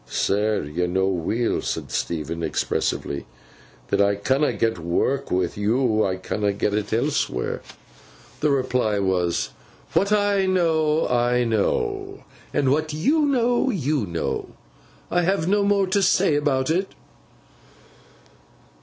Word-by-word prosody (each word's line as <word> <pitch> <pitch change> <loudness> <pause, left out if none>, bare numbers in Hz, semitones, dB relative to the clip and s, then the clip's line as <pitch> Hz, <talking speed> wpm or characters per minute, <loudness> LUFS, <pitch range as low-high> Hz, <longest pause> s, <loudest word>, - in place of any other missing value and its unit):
'Sir, 105 - 0
yo 80 +5 -2
know 95 +2 +1
weel,' 95 +6 0
said - - -4
Stephen 85 0 -3
expressively, 70 -3 -2 0.6
'that - - +1
if 100 - +5
I 100 - +1
canna 135 +8 +1
get 115 -5 -1
work 125 +12 -1
wi' 90 -1 +1
yo, 110 +1 +1
I 95 -1 0
canna 100 +2 -2
get 100 +1 -1
it 105 0 -1
elsewheer.' 140 +7 -1 0.8
The 150 - +2
reply 125 -6 +1
was, 95 -3 0 0.4
'What 200 +1 +2
I 205 -2 +2
know, 160 -4 +2
I 125 0 +2
know; 400 - -1 0.3
and 135 -2 +1
what 155 +2 0
you 290 - +2
know, 245 -1 +2
you 150 - 0
know. 85 -1 -3 0.6
I 175 - +3
have 175 -1 0
no 205 +2 +3
more 200 -1 +3
to 190 +2 +1
say 190 -2 +3
about 145 -1 +1
it. 185 +4 -1
130 Hz, 135 wpm, -23 LUFS, -, 0.8 s, if